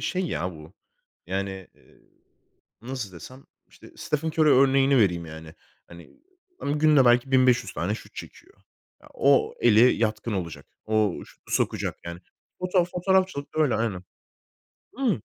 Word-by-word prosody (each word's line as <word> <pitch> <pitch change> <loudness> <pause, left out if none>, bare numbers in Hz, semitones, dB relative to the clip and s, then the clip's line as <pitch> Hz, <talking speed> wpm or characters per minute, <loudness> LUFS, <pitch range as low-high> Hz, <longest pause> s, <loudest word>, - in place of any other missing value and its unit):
şey 185 0 -2
ya 90 - -3
bu, 80 +1 -13 0.5
yani, 95 +2 -2 0.2
eee, - - -25 0.8
nasıl 120 -5 -6
desem, 130 - -12 0.2
işte, - - -17
Stephen 150 +2 -2
Curry 155 -1 +3
örneğini 135 0 +4
vereyim, 90 -6 +1
yani. 80 0 -11 0.3
Hani, 85 0 -14 0.5
ımm, 145 +1 -1
günde 150 -3 +5
belki 120 +2 +3
1.500 125 -5 +3
tane 95 +5 -2
şut - - -12
çekiyor. - - -11 0.5
Ya, - - -17
o 140 0 +3
eli 110 -2 +5
yatkın 110 0 -2
olacak. 90 -5 -5 0.2
O 110 -4 +1
şutu - - -15
sokacak - - -1
yani. 85 0 -7 0.4
Foto 180 -1 +1
fotoğrafçılık 180 -4 -1
da 155 - 0
öyle, 140 -6 +1
aynen. 105 -6 -2 1.0
Imm 245 - +1
120 Hz, 140 wpm, -25 LUFS, 95-145 Hz, 1.0 s, günde